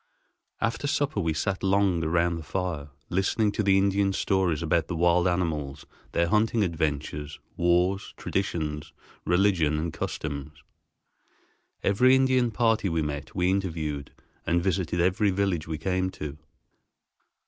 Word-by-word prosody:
After 145 - -1
supper 145 +1 0
we 80 -2 0
sat 95 +4 -1
long 95 -3 +2
around 85 +1 +1
the - - -6
fire, 80 -3 -3 0.2
listening 100 +3 +1
to 105 - -1
the 95 -2 +4
Indian's 100 0 +2
stories 90 -5 +1
about 85 +1 +1
the 90 - -3
wild 85 +2 +3
animals, 75 -6 -2 0.3
their 85 0 +2
hunting 110 +2 +2
adventures, 75 -3 -2 0.2
wars, 90 +3 +1
traditions, 80 -5 -3 0.3
religion, 90 -4 +2
and 80 +1 -2
customs. 75 0 -5 1.2
Every 125 +6 +5
Indian 130 -2 +3
party 115 -3 +1
we 80 -1 0
met 75 -1 -5
we 90 0 +2
interviewed, 80 -7 -2 0.3
and 85 +1 +1
visited 90 -2 0
every 95 +4 +2
village 95 -5 0
we 80 -1 -3
came 95 +3 -1
to. 75 0 -7
90 Hz, 135 wpm, -27 LUFS, 80-100 Hz, 1.2 s, Every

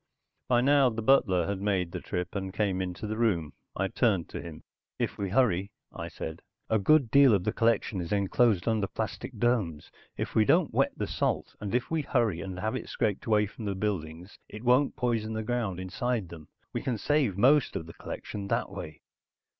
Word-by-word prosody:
By 120 -1 +3
now 140 0 +5
the 115 -1 -4
butler 95 -9 +4
had 100 0 -3
made 95 -4 0
the - - -5
trip, 90 -2 -4
and 95 -1 -3
came 95 -2 0
into 90 +2 -4
the 110 +1 -3
room. 85 -11 +1 0.2
I 95 - 0
turned 105 -6 +1
to - - -6
him. 80 -2 -9 0.3
"If - - -2
we 100 -1 -1
hurry," 100 -4 +2 0.2
I - - -5
said. 80 +1 -7 0.3
"A 110 - +4
good 135 +2 +4
deal 140 -5 +7
of 95 - -1
the 105 +2 -1
collection 115 -4 +1
is 85 - -6
enclosed 100 0 +2
under 110 -3 +1
plastic 110 +3 -5
domes. 105 -10 0 0.3
If - - -3
we 110 - +5
don't - - +3
wet - - +2
the - - -1
salt, - - -2
and 105 +2 -3
if 125 +4 -1
we 160 -1 +1
hurry 115 - 0
and 95 -1 -6
have 110 +5 -1
it - - -5
scraped 110 -3 -1
away 105 -1 +4
from 105 +2 -9
the 100 -1 -2
buildings 90 -3 -4
it 105 +2 -9
won't 125 +3 +3
poison 115 -3 -1
the 110 0 -2
ground 110 -6 -2
inside 95 +2 -2
them. 80 -3 -11 0.3
We - - -2
can 125 -4 -1
save 130 -4 +1
most 135 +6 +4
of 80 - -3
the 80 - -11
collection 100 -1 -6
that - - -1
way." - - -8
105 Hz, 205 wpm, -29 LUFS, 95-120 Hz, 0.3 s, deal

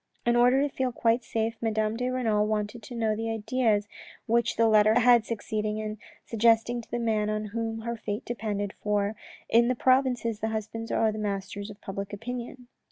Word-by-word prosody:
In 240 0 +3
order 250 +3 +5
to 280 - -14
feel 260 -1 0
quite 230 +1 +1
safe, 225 0 -2
Madame 220 -1 0
de 250 +2 -1
Renal 220 -5 +1
wanted 215 +2 -2
to 240 +3 -9
know 220 -2 +1
the 225 +1 -3
ideas 220 -1 +1 0.4
which 235 +1 +1
the 230 - +4
letter 215 0 +5
had 240 -2 +5
succeeding 215 -1 -2
in 215 -1 -4 0.3
suggesting 230 +1 +2
to - - -18
the 240 - -2
man 220 -3 0
on 215 0 -2
whom 225 -1 -3
her 235 +1 -3
fate 210 0 -5
depended, 205 -4 -3
for, 210 0 0 0.3
in 235 +1 +4
the 255 - +1
provinces 250 -4 +2
the 220 - -1
husbands 220 +1 -4
are 220 -1 +2
the 215 - -5
masters 200 0 -4
of 205 0 -11
public 195 +1 -6
opinion. 245 +3 -6
225 Hz, 190 wpm, -27 LUFS, 215-235 Hz, 0.4 s, order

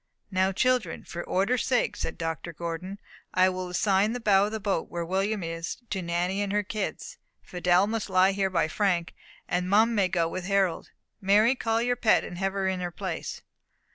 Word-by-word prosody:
"Now, 190 0 +2
children, 245 -3 0
for 175 - -6
order's 200 +7 +1
sake," 250 -2 +1
said 160 - -4
Dr. 165 +1 -4
Gordon, 170 +4 -5 0.4
"I 185 0 +5
will 185 -1 -4
assign 195 +3 +2
the 245 - -3
bow 205 -3 +4
of - - -6
the 220 - -3
boat, 200 -5 -1
where 170 -1 -3
William 195 +3 -1
is, 165 0 -4
to 190 - -1
Nanny 175 +3 -1
and 200 -1 -1
her 210 0 +1
kids; 220 - -5 0.2
Fidelle 180 +1 +2
must 220 -1 -3
lie 185 +1 +4
here 195 0 0
by 175 -4 +1
Frank 175 -1 0 0.3
and 180 +1 -1
Mum 220 +4 +4
may 200 -4 +3
go 175 -3 +1
with 180 +2 -5
Harold. 195 -3 0 0.3
Mary, 210 +5 +4
call 230 -3 0
your 245 0 +1
pet, 225 -2 +3
and 175 - -7
have 195 0 0
her 195 -1 -1
in 190 -1 -1
her 180 -1 -2
place." 175 -1 -5
190 Hz, 200 wpm, -27 LUFS, 175-210 Hz, 0.4 s, I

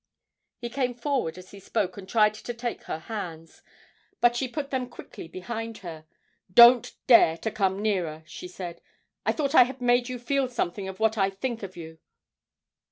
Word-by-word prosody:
He 240 -1 -6
came 250 -2 -1
forward 245 - -1
as 185 0 -12
he 200 - -11
spoke 195 -1 -2
and 195 -1 -10
tried 210 -1 +4
to 240 +3 -6
take 240 0 -5
her - - -3
hands, 165 -3 -7 0.6
but 240 0 +4
she 260 +2 -1
put 280 +2 -5
them 255 -2 -2
quickly 205 - -10
behind 225 +5 -6
her. 160 -2 -8 0.4
'Don't 235 +3 +8
dare 230 -10 +6
to 220 - -3
come 195 -1 0
nearer!' 170 -7 -1
she 160 +3 -9
said; 180 -2 -8 0.5
'I - - +3
thought 285 -2 -1
I 255 - +8
had 260 +1 -8
made 245 0 +2
you 250 - -4
feel 270 +2 0
something 200 -5 -3
of 190 +1 -7
what 220 0 +2
I 195 0 +3
think 230 +4 -4
of 190 -2 -8
you. 160 -1 -9
220 Hz, 185 wpm, -26 LUFS, 185-245 Hz, 0.6 s, Don't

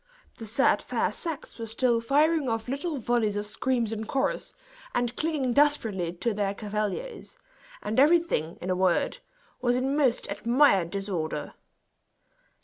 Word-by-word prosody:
The 225 - -6
said 245 +6 +3
fair - - -1
sex 325 -7 -6
were 225 - -4
still 230 +1 +1
firing 295 +3 +2
off 225 0 -2
little 285 +4 -3
volleys 235 -4 0
of 205 0 -2
screams 235 +1 -1
in 220 0 -4
chorus, 265 +4 -1 0.4
and 240 0 0
clinging 300 -6 0
desperately 225 - +2
to 210 +6 -2
their 200 -1 -1
cavaliers; 215 - -4 0.5
and 220 +4 0
everything, 295 - +3
in 185 - -2
a - - +1
word, 185 - +1 0.4
was 245 -1 +2
in 265 +2 0
most 270 -5 +2
admired 235 - +3
disorder. 190 -5 -3
235 Hz, 140 wpm, -27 LUFS, 205-275 Hz, 0.5 s, said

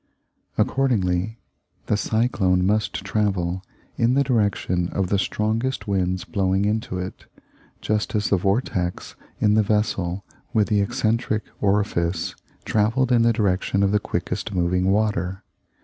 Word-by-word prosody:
Accordingly, 110 -6 +1 0.5
the - - +1
cyclone 100 -5 +1
must 105 +2 +1
travel 95 -3 0 0.3
in 120 +2 +3
the 140 - +4
direction 100 -8 +1
of 95 -2 -1
the 100 - +2
strongest 110 +6 -1
winds 95 -2 0
blowing 95 0 0
into 105 -2 -1
it, 90 +1 -6 0.6
just 105 +1 -1
as 105 -1 0
the 100 - +5
vortex 95 -2 -1 0.2
in 105 -1 +3
the 110 - +5
vessel 100 -3 0 0.3
with 110 -2 +2
the 105 -2 +3
eccentric 110 +2 0 0.2
orifice 95 -4 0 0.3
travelled 115 +5 +1
in 120 -2 +5
the 115 0 +4
direction 100 -2 +1
of 100 - +2
the 105 - +3
quickest 100 - -3
moving 90 +1 +1
water. 95 -2 0
100 Hz, 135 wpm, -23 LUFS, 95-110 Hz, 0.6 s, the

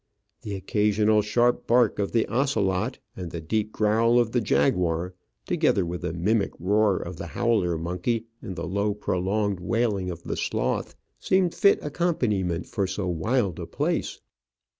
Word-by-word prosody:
The 105 -4 -5
occasional 105 +2 +2
sharp 120 +4 +1
bark 120 -3 +3
of 100 - -1
the 115 -2 +2
ocelot 115 -4 0 0.2
and 90 -2 -6
the 85 - -5
deep 105 +7 -1
growl 110 +3 +3
of 120 -2 +2
the 120 - +1
jaguar, 85 +1 +1 0.3
together 95 -3 +2
with 85 +1 -4
the - - -2
mimic 100 +6 0
roar 100 +2 +2
of 85 0 -6
the 85 - -6
howler 100 -5 +1
monkey, 90 +8 -2 0.2
and 95 -5 -6
the 85 - -4
low, 100 +3 0
prolonged 100 0 -1
wailing 100 -1 0
of 85 -1 -7
the - - -3
sloth, - - -2 0.2
seemed 185 -2 +2
fit 200 -2 +4
accompaniment 115 - 0
for 100 -4 -2
so 95 0 -3
wild 95 +3 0
a - - -5
place. - - -2
105 Hz, 160 wpm, -25 LUFS, 90-115 Hz, 0.3 s, fit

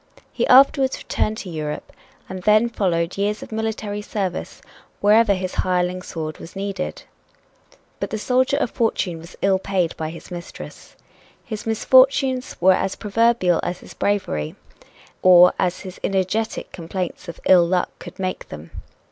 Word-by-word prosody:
He - - 0
afterwards 270 +1 +5
returned 215 0 -2
to 190 - -7
Europe, 150 -2 -5 0.3
and 185 0 -7
then 215 +4 +4
followed 175 -4 -1
years 210 +1 -1
of - - -12
military 220 -2 -3
service 195 -3 -4 0.4
wherever 210 0 +4
his 185 0 -4
hireling 180 0 0
sword 155 -3 -6
was 165 - -11
needed. 195 -1 -4 1.0
But - - -3
the 220 - -3
soldier 255 +5 +1
of 265 - -1
fortune 185 -7 -1
was 165 +1 -12
ill 195 -1 +3
paid 185 -3 -1
by 155 -1 -3
his 165 +2 -11
mistress. 175 -1 -9 0.5
His 215 -1 -6
misfortunes 260 +3 +3
were 185 +2 +6
as 190 +1 -1
proverbial 215 -4 +2
as 180 - -4
his - - -12
bravery, 135 - -1 0.7
or 180 -1 +7
as 180 0 0
his 185 -1 -9
energetic 195 +3 -1
complaints 180 +1 -5
of 170 - -8
"ill 175 -2 +6
luck" 180 0 0
could - - -10
make 185 -1 -4
them. 75 +2 -10
190 Hz, 150 wpm, -22 LUFS, 180-220 Hz, 1.0 s, or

